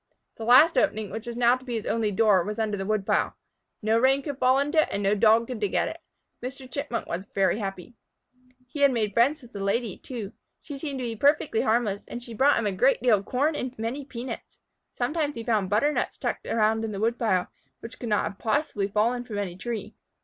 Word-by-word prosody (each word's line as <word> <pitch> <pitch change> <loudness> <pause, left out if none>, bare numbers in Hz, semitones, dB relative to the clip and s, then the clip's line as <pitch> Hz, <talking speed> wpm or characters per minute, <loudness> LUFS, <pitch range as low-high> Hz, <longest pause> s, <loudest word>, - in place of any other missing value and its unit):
The 225 - -6
last 265 +8 +7
opening, 215 -8 0
which 220 +3 -6
was 235 0 -5
now 240 0 +5
to 255 - -11
be 245 -2 -4
his 220 - -3
only 225 -2 0
door, 205 -3 +4
was 210 +4 -4
under 215 -2 -1
the 195 -1 -4
woodpile. 215 -2 0 0.5
No 220 +2 +3
rain 270 +3 +3
could 285 -1 -5
fall 255 +1 +4
into 295 +3 +3
it - - 0
and 200 - -2
no 200 +1 +3
Dog 220 +2 +4
could 245 -2 -6
dig 205 -2 -1
at - - +2
it. - - -8 0.4
Mr. 260 +1 -7
Chipmunk 260 -2 -4
was 185 +4 -5
very 195 +2 +2
happy. 195 +2 -6 0.7
He 280 +3 +3
made 225 -6 -1
friends 270 +6 +2
with 245 - -15
the 200 - -6
Lady, 205 0 -1
too. 225 -6 -7 0.3
She 285 -3 -8
seemed 280 -2 -4
to 255 - -4
be 230 -1 -3
perfectly 280 -1 +2
harmless, 220 -3 +1
and 240 - -7
she 235 - -9
brought 275 +6 +4
him 230 - 0
a 205 - +1
great 250 +9 +3
deal 230 -5 +5
of 195 - -11
corn 290 +5 0
and 255 -3 -4
many 230 +6 -3
peanuts. 255 -1 -7 0.3
Sometimes 295 +4 -1
he 230 - -5
found 215 -5 0
butternuts 255 +9 +1
tucked - - -3
around 220 0 +2
in 220 -1 -3
the 195 - -4
woodpile, 220 -4 +1 0.3
which 230 - -10
could 240 - -5
not 205 -1 0
possibly 220 -4 0
have 200 - -19
fallen 235 +4 +2
from 225 -4 -6
any 195 -4 -3
tree. 215 0 -5
230 Hz, 225 wpm, -26 LUFS, 210-255 Hz, 0.7 s, last